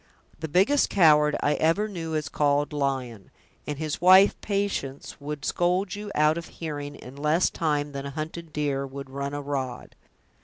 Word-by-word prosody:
The 160 - -4
biggest 195 - +3
coward 150 -5 +5
I 145 - +3
ever 165 +7 +2
knew 165 -6 -5
was 155 -1 -1
called 145 0 +1
Lyon; 130 -7 -3 0.4
and 150 - -3
his 155 0 -3
wife, 185 +3 +7
Patience, 200 -10 -3
would 145 0 -5
scold 180 +2 0
you 205 0 -6
out 155 +2 +3
of 170 - -9
hearing 145 -3 -5
in 130 -1 -11
less 150 +5 +2
time 150 -3 -1
than 140 0 -5
a - - -5
hunted 160 +3 -6
deer 140 -2 -1
would 135 0 -9
run 140 +1 -4
a 145 - -4
rod. 135 -3 -4
150 Hz, 175 wpm, -26 LUFS, 140-170 Hz, 0.4 s, wife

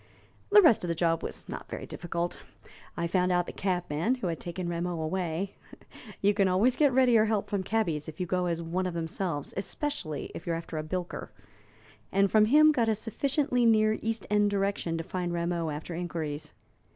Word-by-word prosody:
"The 415 -1 +8
rest 240 - +5
of - - -2
the 170 - -1
job 165 -1 +1
was - - -5
not - - -7
very - - -5
difficult. 170 0 -4 0.6
I 170 - 0
found 180 +1 +1
out 175 -1 +2
the - - -7
cabman 180 - 0
who 250 - -6
had 165 -3 -2
taken 175 +1 -4
Rameau 170 0 -2
away 175 +3 -2 0.7
you 205 +1 +4
can 200 -2 +3
always 205 +8 +3
get 290 -3 +4
readier 245 -4 +5
help 215 -2 -1
from 200 -2 0
cabbies 180 -7 -1
if 155 - -11
you 180 - 0
go 180 0 0
as 170 -1 -2
one 180 +3 -1
of 175 - -4
themselves, 165 -2 -3
especially 195 - -3
if - - -9
you 170 - +1
are - - 0
after 165 -1 -5
a - - -3
bilker 175 +2 -4 0.8
and 195 0 +3
from 215 -1 +6
him 305 +6 +6
got 235 -6 +1
a 220 - +2
sufficiently 250 +4 0
near 215 -1 +4
East 225 -2 -2
End 210 0 +4
direction 195 -4 -1
to 165 - -3
find 175 0 -3
Rameau 170 -1 -1
after 150 +3 -5
inquiries. 165 -3 -4
180 Hz, 200 wpm, -29 LUFS, 170-215 Hz, 0.8 s, The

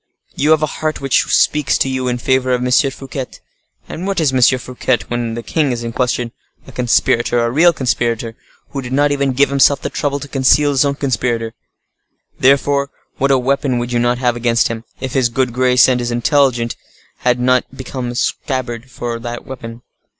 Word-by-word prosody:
You 150 - 0
have 155 -1 +4
a 155 - -3
heart 155 0 -1
which 135 -2 +1
speaks 150 -3 +2
to - - +1
you 130 -1 -2
in 125 -1 0
favor 130 +1 +1
of 125 0 -2
M. 125 - -1
Fouquet. 135 -1 0 0.6
And 180 +4 -6
what 195 -2 -1
is 150 -5 +1
M. 130 - +1 0.2
Fouquet, 125 0 -1
when 120 -1 -2
the 120 - -5
king 150 -1 0
is 120 -1 -3
in 115 0 -5
question?—A 120 -1 -4
conspirator, 120 -1 +1
a 115 0 +1
real 165 +7 +5
conspirator, 120 -5 -2 0.4
who 140 - -4
did 125 0 -6
not 145 +1 +2
even 140 -2 0
give 140 +3 +3
himself 140 0 +4
the - - -3
trouble 140 -1 -2
to 145 - -8
conceal 140 +2 +3
his 135 - +1
being 140 -1 +2
a - - -13
conspirator; 120 -4 -1 0.9
therefore, 140 +1 +3 0.3
what 135 - +2
a 135 - +4
weapon 135 0 0
would 120 0 -3
you 120 - +1
not 120 +1 +1
have 125 -1 0
against 120 0 +1
him, 115 0 -6
if 130 -2 -5
his 130 -3 +2
good 125 0 -1
grace, 125 0 +4
and 125 -1 +1
his 120 0 -2
intelligence 120 -1 +1 0.4
had 125 0 +1
not 125 0 +1
made 130 -1 -10
a 125 -2 -3
scabbard 125 -1 -3
for 120 -1 -5
that 120 0 -6
weapon. 120 -2 -9
130 Hz, 200 wpm, -17 LUFS, 120-140 Hz, 0.9 s, real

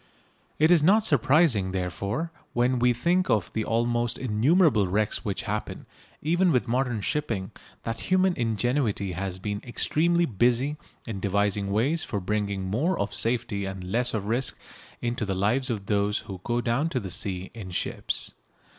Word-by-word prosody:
It 155 +3 +4
is 170 -3 +6
not 205 +7 +4
surprising, 130 - +3
therefore, 100 - -2 0.2
when 125 +1 +2
we 125 +1 +4
think 175 +10 +1
of 105 -5 +1
the 110 - -1
almost 120 +1 0
innumerable 125 - +3
wrecks 105 +3 0
which - - -2
happen, - - -4 0.4
even 175 +4 +3
with 125 -5 +1
modern 120 -2 0
shipping, 110 -7 -2 0.3
that 115 0 -3
human 185 0 +4
ingenuity 115 -3 0
has 95 +1 -3
been 105 +2 -4
extremely 170 +7 +2
busy 125 - +1 0.3
in 110 -4 -5
devising 100 0 0
ways 135 +11 +1
for 105 - -3
bringing 100 0 -2
more 140 - 0
of - - -2
safety 115 -4 0
and 95 -1 -5
less 115 +6 0
of 100 -2 -2
risk 120 +4 0 0.5
into 120 -1 -1
the 100 -2 -1
lives 120 +8 +1
of 105 -5 -3
those 105 0 +1
who 95 -4 -9
go 120 0 0
down 125 +7 0
to 130 - -1
the 95 -5 -6
sea 95 0 -3
in 110 -5 -8
ships. 90 - -2
115 Hz, 165 wpm, -26 LUFS, 100-135 Hz, 0.5 s, is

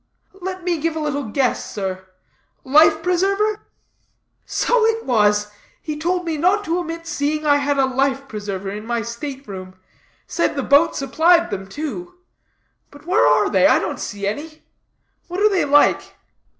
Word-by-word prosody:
"Let 370 0 -5
me 345 -2 -1
give 325 +1 -1
a - - -2
little 290 -2 -2
guess, 250 +4 0
sir. 190 -2 -5 0.6
Life 315 +4 +4
preserver?" 395 +4 0 0.8
"So 485 -2 +1
it 450 0 -1
was. 210 -3 +2 0.3
He 305 - -5
told 355 +4 -1
me 325 -2 -2
not 375 +7 +2
to 345 -2 -1
omit 330 -1 -6
seeing 300 -1 -2
I 290 -1 +4
had 285 0 0
a 270 - +4
life 270 +1 -1
preserver 200 -3 -5
in 210 +1 -6
my 235 -1 -1
state 265 +4 -7
room; 185 -2 -8 0.5
said 340 - -1
the 275 - -2
boat 290 +5 +4
supplied 335 +5 +3
them, 195 0 -5
too. 315 - -6 0.7
But 285 +1 -16
where 370 +5 +3
are - - +3
they? - - +5
I - - +5
don't - - -3
see 200 -1 -5
any. 305 +10 -5 0.6
What 360 +2 -4
are 425 +1 +5
they 385 -3 +1
like?" 290 +1 +3
295 Hz, 165 wpm, -20 LUFS, 245-345 Hz, 0.8 s, they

